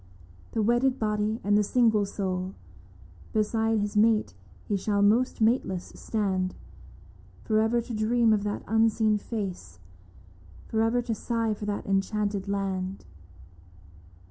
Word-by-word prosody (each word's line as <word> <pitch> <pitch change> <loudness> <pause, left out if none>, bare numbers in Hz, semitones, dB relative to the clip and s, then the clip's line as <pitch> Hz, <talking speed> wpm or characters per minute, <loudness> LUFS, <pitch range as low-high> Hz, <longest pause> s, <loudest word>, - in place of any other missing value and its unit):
The 220 - +1
wedded 240 +4 +2
body 215 +1 -1
and 205 +1 +2
the 210 - +5
single 220 -2 +2
soul. 185 -1 -3 0.8
Beside 220 +1 +1
his 205 0 -3
mate 215 - +3 0.3
he 205 - 0
shall 200 +1 +1
most 230 +4 +2
mateless 220 -6 +1
stand, 190 -4 -1 0.9
For 215 -1 +2
ever 230 +2 +2
to 235 +1 -7
dream 225 +1 +3
of 210 - +1
that 205 0 -3
unseen 220 -1 +2
face 185 - -5 0.5
— 90 -2 -22
For 220 - +1
ever 235 +2 +2
to 235 - -2
sigh 230 0 -1
for 210 0 -6
that 205 -1 -3
enchanted 200 0 -1
land. 195 -1 -3
210 Hz, 135 wpm, -27 LUFS, 195-225 Hz, 0.9 s, the